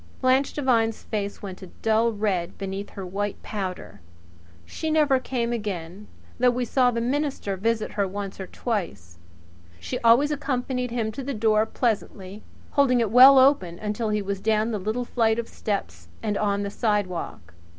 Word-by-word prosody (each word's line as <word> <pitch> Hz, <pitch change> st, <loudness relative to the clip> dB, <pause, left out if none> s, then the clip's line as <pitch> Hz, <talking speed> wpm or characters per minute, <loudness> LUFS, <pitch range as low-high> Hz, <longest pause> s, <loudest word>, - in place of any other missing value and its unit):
Blanche 260 Hz, +1 st, +2 dB
Devine's 230 Hz, -6 st, +1 dB
face 205 Hz, -2 st, -4 dB
went 190 Hz, -1 st, -7 dB
a 190 Hz, -, -9 dB, 0.2 s
dull 225 Hz, +1 st, +3 dB
red 205 Hz, -5 st, -2 dB
beneath 195 Hz, +1 st, -5 dB
her 195 Hz, -, -7 dB
white 200 Hz, +2 st, -3 dB
powder. 185 Hz, -, -5 dB, 0.6 s
She 315 Hz, -, -4 dB
never 300 Hz, -4 st, +3 dB
came 240 Hz, -2 st, -2 dB
again 200 Hz, -3 st, -5 dB, 0.3 s
though 250 Hz, 0 st, +5 dB
we 245 Hz, 0 st, -1 dB
saw 250 Hz, +2 st, +3 dB
the 235 Hz, -1 st, -1 dB
minister 265 Hz, -4 st, -1 dB
visit 225 Hz, +3 st, -1 dB
her 200 Hz, -2 st, 0 dB
once 195 Hz, 0 st, -6 dB
or 190 Hz, -, -5 dB
twice. 100 Hz, -, -4 dB, 0.6 s
She 85 Hz, 0 st, -4 dB
always 240 Hz, +6 st, +4 dB
accompanied 260 Hz, -3 st, -2 dB
him 230 Hz, -2 st, -2 dB
to 245 Hz, -, -6 dB
the 275 Hz, 0 st, -4 dB
door 215 Hz, 0 st, +2 dB
pleasantly, 210 Hz, -4 st, -3 dB, 0.3 s
holding 270 Hz, -4 st, +3 dB
it 225 Hz, -3 st, 0 dB
well 260 Hz, +3 st, +9 dB
open 260 Hz, -11 st, +4 dB
until 215 Hz, +2 st, -2 dB
he 210 Hz, -1 st, 0 dB
was 195 Hz, 0 st, -4 dB
down 220 Hz, +1 st, +1 dB
the 215 Hz, -, -2 dB
little 220 Hz, +6 st, -2 dB
flight 225 Hz, -2 st, +1 dB
of 235 Hz, -1 st, -3 dB
steps 85 Hz, -, -4 dB, 0.2 s
and 210 Hz, -2 st, -1 dB
on 200 Hz, -1 st, 0 dB
the 200 Hz, -, -4 dB
sidewalk. 185 Hz, -, -2 dB
215 Hz, 170 wpm, -25 LUFS, 195-245 Hz, 0.6 s, well